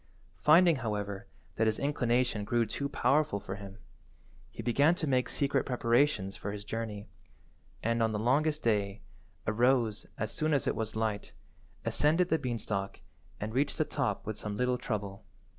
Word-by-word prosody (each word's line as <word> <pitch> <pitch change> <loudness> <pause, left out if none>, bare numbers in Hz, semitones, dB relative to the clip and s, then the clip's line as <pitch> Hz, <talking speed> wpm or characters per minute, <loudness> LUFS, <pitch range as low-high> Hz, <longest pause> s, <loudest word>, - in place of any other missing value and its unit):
Finding, 165 +1 +6
however, 105 -4 -3 0.3
that 110 - +3
his 110 - +1
inclination 120 -5 +1
grew 120 +2 +1
too 140 +6 -3
powerful 150 -5 +2
for 95 -1 -6
him, 100 -1 -10 0.7
he - - -8
began 140 +7 +4
to 170 - -2
make 130 -3 +1
secret 140 -1 +1
preparations 120 -5 +1
for 100 - -5
his 100 0 -7
journey, 110 -2 -4 0.8
and, 115 +1 +1
on 110 0 +2
the 105 - -1
longest 145 +7 +1
day, 105 -3 0 0.4
arose 115 0 +2
as 110 - -2
soon 155 -1 +1
as 140 - 0
it - - 0
was 110 -1 -3
light, 110 -2 -2 0.5
ascended 165 +5 +3
the 160 - +2
beanstalk, 110 -6 -3 0.4
and 110 +1 -4
reached 140 +3 +1
the - - +2
top - - -2
with 110 0 -4
some 105 -1 -4
little 125 +1 +1
trouble. 100 -4 -4
115 Hz, 160 wpm, -31 LUFS, 105-140 Hz, 0.8 s, Finding